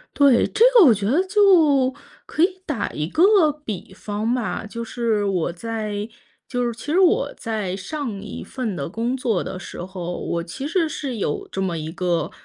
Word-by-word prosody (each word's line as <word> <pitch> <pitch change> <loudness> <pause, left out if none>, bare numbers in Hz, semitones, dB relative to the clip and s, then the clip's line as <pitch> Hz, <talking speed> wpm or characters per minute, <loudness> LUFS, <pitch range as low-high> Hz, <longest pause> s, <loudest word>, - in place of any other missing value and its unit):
对， 280 -4 +5
这 430 +3 +2
个 415 -8 +9
我 240 - +7
觉 200 -1 -3
得 285 - +3
就 325 -10 +4 0.3
可 315 - -3
以 375 0 0
打 240 -10 -2
一 150 +1 -3
个 345 - +5
比 195 -2 -6
方 210 +4 -2
吧。 240 -3 -2
就 230 +2 -6
是 225 -3 -1
我 180 -3 0
在 215 +1 -4 0.4
就 245 -1 -1
是 235 - -1
其 235 - -11
实 365 - +3
我 410 +6 +3
在 215 -5 -3
上 255 +6 -4
1 210 - -7
份 235 -7 -4
的 140 +1 -4
工 235 +6 -2
作 230 -7 0
的 185 - -6
时 175 - -7
候， 180 -2 -5
我 170 0 -2
其 265 +11 -6
实 330 -1 +1
是 265 -7 -4
有 150 - -2
这 190 - -3
么 175 -3 -1
一 155 +1 -5
个， 175 -3 -1
230 Hz, 205 characters per minute, -22 LUFS, 190-290 Hz, 0.4 s, 个